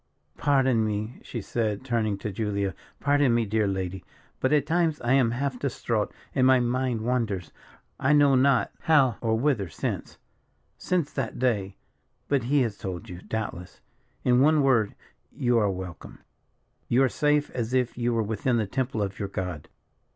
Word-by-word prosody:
"Pardon 130 -5 +3
me," 110 +2 -3
she 115 - -6
said, 110 +1 -2
turning 110 -5 0
to 105 +1 -4
Julia, 100 -1 -2 0.3
"pardon 145 -4 +3
me, 115 -1 +2
dear 110 0 +1
lady; 95 -2 -3 0.4
but 130 - +1
at 150 -2 +3
times 165 -1 +1
I 120 +2 +1
am 130 -4 +4
half 130 +1 -2
distraught, 115 -5 -1 0.2
and 130 -1 +3
my 130 -1 +6
mind 125 -1 0
wanders, 110 -7 -1 0.5
I 135 - +2
know 145 -2 +5
not 130 0 +3
how 135 -8 +3
or 110 -1 +1
whither, 115 - 0
since - - -4 0.6
since 175 -5 -1
that 130 -5 -3
day 105 -6 0 0.5
but 140 -4 +1
he 140 +3 +3
has 110 -4 -4
told 90 -2 -6
you, 90 0 -8
doubtless. 100 -5 -5 0.4
In 125 0 +4
one 150 +1 +4
word, 120 -6 +2 0.4
you 120 -2 +1
are 105 -2 +2
welcome. 95 -2 -7 0.7
You 125 +3 +3
are - - +5
safe 150 +3 +1
as 120 -2 -3
if 125 -2 +1
you 120 0 0
were 115 -1 +1
within 110 +3 0
the 110 - +1
temple 125 +1 -2
of 100 0 -5
your 100 - -3
God. 90 -5 -5
120 Hz, 170 wpm, -26 LUFS, 105-135 Hz, 0.7 s, my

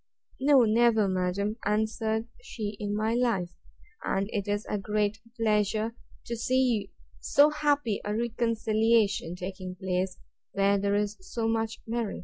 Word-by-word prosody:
—No, 270 -1 +6
never, 225 -1 +4
madam, 190 +3 -1
answered 220 +1 0
she, 215 - -5
in 205 0 -2
my 215 +2 0
life; 230 -8 +1 0.5
and 195 +1 0
it 205 -2 -2
is 205 +1 -1
a 210 - -1
great 210 +2 -1 0.2
pleasure 215 0 +1 0.3
to 235 - -3
see 235 -3 +1 0.3
so 290 +1 +4
happy 290 -7 +1
a 210 0 -2
reconciliation 225 -4 +1
taking 185 0 -6
place, 185 -1 -2 0.4
where 200 0 +3
there 200 +1 +1
is 205 0 -1
so 225 +4 -3
much 225 0 -1
merit. 230 -2 -2
215 Hz, 135 wpm, -28 LUFS, 200-230 Hz, 0.5 s, No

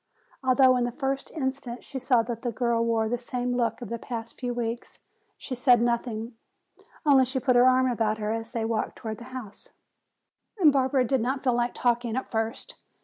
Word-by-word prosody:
Although 260 0 +5
in 245 - +1
the 240 - -1
first 270 +1 -3
instant 265 -4 -4
she 270 - -5
saw 245 -2 +3
that 230 0 -5
the 245 - -2
girl 235 0 0
wore 225 -1 +1
the 240 +2 -1
same 245 0 -3
look 235 0 -1
of 225 - -8
the 235 - -4
past 230 -1 -6
few 245 -1 -4
weeks, 235 0 -4 0.4
she 265 - -7
said 250 -1 +4
nothing. 235 -1 -1 0.7
Only 275 -3 +6
she 260 +1 -1
put 255 -1 +2
her 245 +1 +6
arm 255 0 +3
about 225 -3 0
her 210 0 -2
as 225 +1 -4
they 230 -3 -2
walked 225 -1 -2
toward 220 -1 -6
the 235 - -10
house. 255 -5 -9 0.9
Barbara 275 -5 +4
did 265 0 +1
not 260 +3 -1
feel 255 -3 +2
like 240 0 0
talking 240 -1 0
at 260 - -4
first. 225 +1 -3
245 Hz, 200 wpm, -27 LUFS, 230-260 Hz, 0.9 s, Only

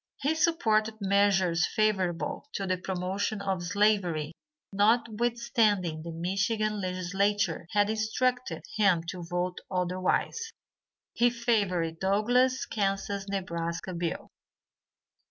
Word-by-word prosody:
He 290 +3 +1
supported 225 -10 +2
measures 195 -3 +3
favorable 215 +6 0
to 195 - -2
the 185 -1 0
promotion 190 +3 -2
of 195 -2 -2
slavery 180 -5 +1 0.4
notwithstanding 220 - +1
the 170 +1 -6
Michigan 195 +5 -1
legislature 185 0 0
had 205 -1 +4
instructed 220 +4 -1
him 190 -6 +3
to 180 - -7
vote 175 +1 -3
otherwise. 185 - -1 0.6
He 240 +1 +4
favored 200 -9 0
Douglass' 245 +7 +2
Kansas 195 -1 -2
Nebraska 175 -2 -3
bill. 170 -1 -4
200 Hz, 100 wpm, -29 LUFS, 180-220 Hz, 0.6 s, had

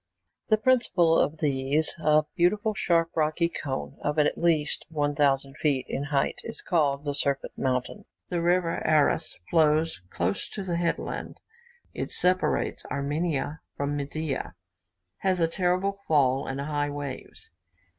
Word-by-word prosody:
The 215 - +4
principal 215 -9 +3
of 155 +2 0
these, 140 +1 +1
a 155 -1 +4
beautiful 205 +5 +2
sharp 170 -4 +1
rocky 155 +2 +2
cone, 135 -5 -5
of 150 +1 -1
at 150 - +3
least 160 -4 +1
1,000 145 -3 +1
feet 140 -4 +1
in 140 - -3
height, 145 -1 0
is 230 - -7
called 145 -5 +1
the 145 - -1
Serpent 140 -1 -1
Mountain. 125 -1 -2 0.2
The 175 -2 -1
river 175 0 +1
Aras 155 +1 +2
flows 155 - +3
close 90 +3 -2
to 200 - -5
the 175 -2 -2
headland. 170 -1 -3 0.5
It - - -4
separates 180 +1 +1
Armenia 145 +1 -2 0.2
from 140 +1 -1
Media, 145 0 -3 0.6
has 185 -2 0
a 165 - +3
terrible 180 +3 +1 0.2
fall, 135 -3 +3
and 135 +1 -3
high 145 0 -1
waves. 145 -2 -7
155 Hz, 135 wpm, -27 LUFS, 140-170 Hz, 0.6 s, The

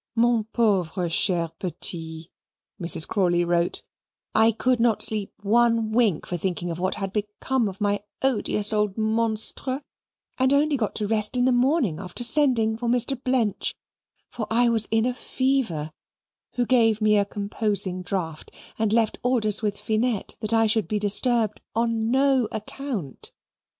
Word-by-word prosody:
MON 235 -1 +2
PAUVRE 190 -6 0
CHER 170 -1 +1
PETIT, 165 -2 -4 0.5
(Mrs. 170 -2 +4
Crawley 175 -4 +1
wrote) 170 0 0 0.5
I 225 +1 +4
could 250 +2 0
not 230 -2 +2
sleep 210 -3 +3
ONE 230 +1 +2
WINK 220 -8 +1
for 175 - -3
thinking 175 0 -3
of 165 - -6
what 185 +1 -1
had 195 -2 -5
become 215 +4 -1
of 190 - -11
my 205 0 0 0.2
odious 215 -4 0
old 210 -1 0
monstre, 225 +5 -1 0.6
and 260 +1 +3
only 290 +1 +2
got 225 -6 -2
to 210 - -2
rest 215 +2 0
in 245 - +2
the 260 - +3
morning 250 - +1
after 190 +4 -4
sending 240 -4 +4
for 240 +1 -4
Mr. 250 +2 +1
Blench 245 -6 0 0.5
(for 220 -3 -6
I 240 +2 +3
was 225 -2 +3
in 225 +1 +1
a 250 - 0
fever), 245 - -1 0.6
who 245 - 0
gave 225 -3 +3
me 215 -1 +3
a - - +3
composing 200 -2 -2
draught 180 -4 -4 0.3
and 220 -2 +1
left 225 -1 +1
orders 220 -5 +1
with 205 -2 -2
Finette 220 -1 -1
that 215 0 -1
I 225 0 +3
should 215 -4 +1
be 210 - -1
disturbed 215 +1 +2
ON 230 -1 0
NO 265 -2 +2
ACCOUNT. 215 - -6
220 Hz, 155 wpm, -24 LUFS, 195-240 Hz, 0.6 s, Mrs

